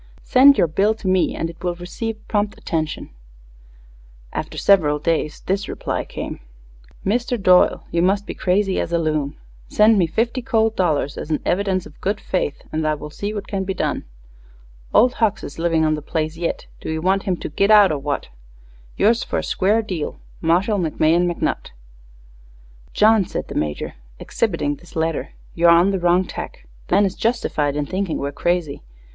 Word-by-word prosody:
Send 275 +2 +6
your - - +4
bill 195 +7 +1
to 220 -3 -7
me 185 -1 +2
and 165 - -2
it 165 0 -12
will 175 -1 -1
receive 215 +5 -6
prompt 205 -1 -1
attention_. 155 -2 -3 1.2
After - - -5
several 155 -7 +4
days 155 -1 -1
this 195 +1 -1
reply - - -3
came: - - -6 0.7
_Mister 240 +4 0
Doyle 185 -2 +4
you 170 - +1
must 195 +3 +2
be - - -5
crazy 190 +1 +1
as - - -2
a 170 - +2
loon. 155 -3 -1 0.3
Send 215 0 +4
me 175 - +3
fifty 230 +9 -1
cold 225 -1 +1
dollars 150 -6 0
as - - -7
an 155 - 0
evvidence 190 -1 0
of 150 - -15
good 200 +2 -1
fayth 180 -6 -2
and 155 0 -1
I 155 - +1
wull 150 0 -9
see 205 +6 -4
what 205 -1 -5
can 195 -2 -2
be 190 0 -3
done. - - -1 0.9
Old 250 +2 +5
Hucks 220 -2 +1
is 145 - -8
livin 165 -1 +2
on 155 - +2
the 150 - -3
place 155 +1 -2
yit 170 +1 -3
do - - -5
you 160 - -2
want 190 +4 +1
him 180 - +1
to - - -5
git 200 +7 +1
out 210 -4 +7
or 150 - -1
what? 145 +1 -3 0.7
Yours 230 +3 +3
fer - - -3
a - - -1
square 210 +4 +1
deal 180 -8 -4 0.2
Marshall 185 +6 +2
McMahon 170 +1 +2
McNutt_. 170 - -2 1.2
"John," 215 -1 +4
said - - -5
the - - -5
Major, 75 -1 -3 0.2
exhibiting 150 - -1
this 175 - -17
letter, 160 -1 -2 0.2
"you're 170 0 +4
on 170 +3 +5
the 195 - -1
wrong 175 +1 +3
tack. - - -8 0.2
The - - +1
man 200 +1 +5
is 190 - -1
justified 155 - -1
in 150 0 -1
thinking 185 +2 -2
we're 140 0 -3
crazy. 175 -1 -1
180 Hz, 185 wpm, -21 LUFS, 160-205 Hz, 1.2 s, out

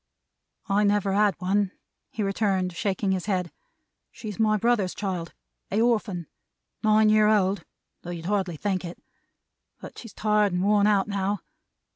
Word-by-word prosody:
"I 205 0 +2
never 205 -1 +2
had 205 -1 +3
one," 195 +1 0 0.4
he 215 - -3
returned, 195 -2 0
shaking 195 +1 -1
his 185 0 -2
head. 180 -4 -1 0.6
"She's 215 -4 -8
my 215 -1 +3
brother's 210 -4 +1
child: 185 -5 -4 0.3
a 205 - 0
orphan. 215 -7 +1 0.6
Nine 215 0 +4
year 215 0 +5
old, 200 -2 +2 0.4
though 175 - -9
you'd 170 -2 -6
hardly 190 -4 -1
think 190 +1 -1
it; 170 0 -7 0.8
but - - -10
she's 230 -4 -11
tired 210 -2 +2
and 180 +1 0
worn 205 0 +4
out 205 -2 +3
now. 200 0 -1
200 Hz, 150 wpm, -26 LUFS, 185-210 Hz, 0.8 s, year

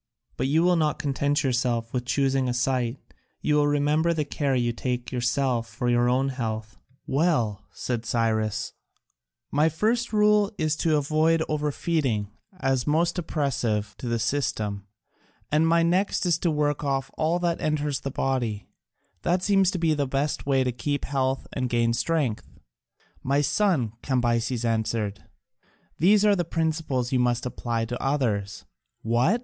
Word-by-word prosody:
But 130 - -1
you 155 +4 +3
will 180 0 +4
not 155 -2 +1
content 145 +1 0
yourself 120 -3 0
with 125 -1 -2
choosing 135 0 +1
a 125 - -1
site, 125 0 0 0.4
you 150 - 0
will 150 0 +3
remember 150 +3 +2
the 155 -2 -1
care 140 -1 -1
you 120 -1 +1
take 125 0 -3
yourself 125 -1 0
for 120 0 -1
your 120 0 +3
own 130 +2 +2
health." 110 -4 -4 0.3
"Well," 130 - 0
said 120 -3 -4
Cyrus, 110 -2 0 0.8
"my 150 +3 +3
first 225 +9 0
rule 210 -1 +3
is 155 -1 0
to 160 -2 +2
avoid 155 +3 +2
over 150 -1 -1
feeding 130 -11 -1 0.3
as 135 -4 0
most 170 +4 +1
oppressive 120 -10 -1
to 125 - -5
the 115 0 0
system, 110 -5 -2 0.6
and 155 +2 +3
my 165 0 +4
next 180 +4 +1
to 170 -1 +1
work 150 -2 0
off 135 -2 -1
all 160 +2 +1
that 175 -1 -1
enters 150 -2 0
the 135 - -4
body: 125 -6 -2 0.6
that 180 +1 +1
seems 195 -2 +4
the 160 -6 0
best 140 +2 -2
way 135 -2 +3
to 125 - 0
keep 145 +4 -2
health 135 -1 -1
and 130 -2 -2
gain 115 -1 +2
strength." 125 -1 -1 0.7
"My 140 +2 +1
son," 145 - +1
Cambyses 120 -2 0
answered, 110 -2 -1 0.7
"these 205 +5 +5
are 205 -1 +5
the 175 - 0
principles 160 -6 -1
you 130 - +2
must 120 0 +1
apply 120 -2 -2
to 120 +2 -5
others." 105 -8 -1 0.4
"What!" 120 - +2
135 Hz, 155 wpm, -25 LUFS, 120-155 Hz, 0.8 s, these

